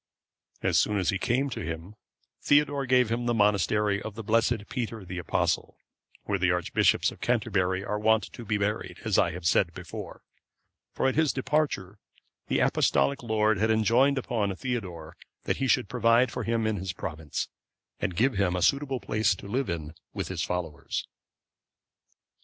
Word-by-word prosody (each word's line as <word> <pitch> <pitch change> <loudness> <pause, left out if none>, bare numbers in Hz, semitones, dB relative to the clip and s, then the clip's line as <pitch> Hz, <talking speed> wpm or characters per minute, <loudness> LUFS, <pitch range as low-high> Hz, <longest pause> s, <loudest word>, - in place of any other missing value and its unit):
As - - +3
soon 105 - +1
as 95 0 +1
he 95 - -2
came 130 +6 +1
to - - -4
him, 80 +4 -6 0.5
Theodore 145 -2 +2
gave 125 -2 +3
him 120 +1 -1
the 120 - +1
monastery 105 -1 +2
of 110 -2 -7
the 115 - -6
blessed 115 0 +1
Peter 115 -5 -4
the 90 0 -5
Apostle,(535) 90 - -3
where 100 -1 -1
the 90 0 +2
archbishops 90 -1 +2
of - - -14
Canterbury 95 -5 0
are 105 0 -2
wont 110 +1 +3
to 120 - -8
be 110 -1 0
buried, 100 -3 -2
as 110 -3 +3
I 95 - +3
have 90 0 -8
said 85 -1 +2
before; 90 -2 -8 0.7
for - - 0
at 130 - +2
his 160 -2 +2
departure, 130 -9 -1 0.5
the - - +1
Apostolic 70 0 +2
lord 110 -3 +1
had 110 +1 +2
enjoined 115 +6 +3
upon 110 -6 -1
Theodore 90 -10 -5 0.3
that - - -1
he 135 - 0
should 110 - +2
provide 115 +2 +3
for - - -4
him 115 -1 0
in 110 -1 0
his 95 0 -4
province, 80 -3 -4 0.5
and 90 - -2
give 130 +8 +3
him 100 -3 +1
a 90 - 0
suitable 140 -2 +1
place 110 +1 +1
to 100 - -10
live 125 +4 -1
in 80 -2 -4 0.2
with - - -3
his - - -3
followers. 85 -4 -3
105 Hz, 175 wpm, -27 LUFS, 90-120 Hz, 0.7 s, As